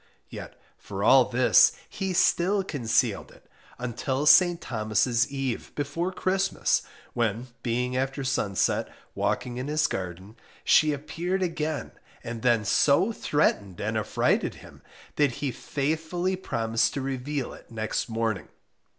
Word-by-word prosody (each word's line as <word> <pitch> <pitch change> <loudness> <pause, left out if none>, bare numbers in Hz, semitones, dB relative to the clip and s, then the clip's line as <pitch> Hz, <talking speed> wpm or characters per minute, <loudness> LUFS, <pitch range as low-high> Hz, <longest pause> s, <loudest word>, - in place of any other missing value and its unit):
Yet - - -9 0.2
for - - -5
all - - +7
this, - - +5
he 195 -2 -4
still 185 +2 +2
concealed 135 -11 0
it - - -20 0.3
until 125 +3 -2
St. 175 +2 +6
Thomas' 115 +2 0
Eve, 135 -3 -3
before 150 +5 -2
Christmas, 190 +1 0 0.3
when, 115 +1 -1
being 125 +1 -1
after 135 +2 -2
sunset, 105 -7 0 0.2
walking 120 -1 -2
in 130 +2 -4
his 150 0 +1
garden, 95 - -5 0.3
she 155 -1 +5
appeared 165 +6 -2
again 155 -3 -3 0.3
and 115 -1 -6
then 115 -3 +2
so 145 - +3
threatened 100 - 0
and 110 +2 -2
affrighted 110 -2 0
him, - - -15 0.4
that 145 -4 +3
he 140 +2 -3
faithfully 160 +8 -2
promised 115 -9 -1
to 140 - -2
reveal 135 +1 -3
it - - -15
next 110 +1 -3
morning. 115 -2 -2
135 Hz, 130 wpm, -26 LUFS, 115-155 Hz, 0.4 s, all